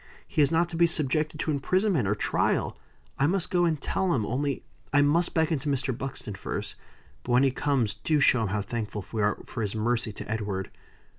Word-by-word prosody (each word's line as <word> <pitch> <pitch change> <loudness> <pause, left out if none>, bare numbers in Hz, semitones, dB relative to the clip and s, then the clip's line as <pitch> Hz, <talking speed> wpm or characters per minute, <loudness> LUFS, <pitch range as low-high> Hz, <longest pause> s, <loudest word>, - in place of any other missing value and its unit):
He - - +1
is 145 - +4
not 170 +1 +3
to 170 - -6
be 170 +1 +5
subjected 155 -1 0
to 155 - 0
imprisonment 170 - +1
or 105 - +1
trial. - - 0 0.4
I 140 - +4
must 185 +3 -1
go 175 -2 +3
and 160 -3 +1
tell 185 +4 0
him, 110 -5 0
only 140 +4 -1 0.3
I 145 0 +5
must 165 +4 +2
beckon 160 -2 +2
to 145 +2 -3
Mr. 135 -2 0
Buxton 130 -4 -5
first. 95 - -5 0.5
But 120 - -2
when 125 +2 +5
he 135 - +4
comes, 130 -6 0
do 150 +7 0
show 125 -3 +4
him 110 - 0
how 105 +2 -1
thankful 105 -3 -4
we 110 - -1
are 105 0 +2
for 115 - -5
his 105 -1 -2
mercy 115 +1 0
to - - -8
Edward." 105 -4 -3
135 Hz, 215 wpm, -27 LUFS, 110-155 Hz, 0.5 s, be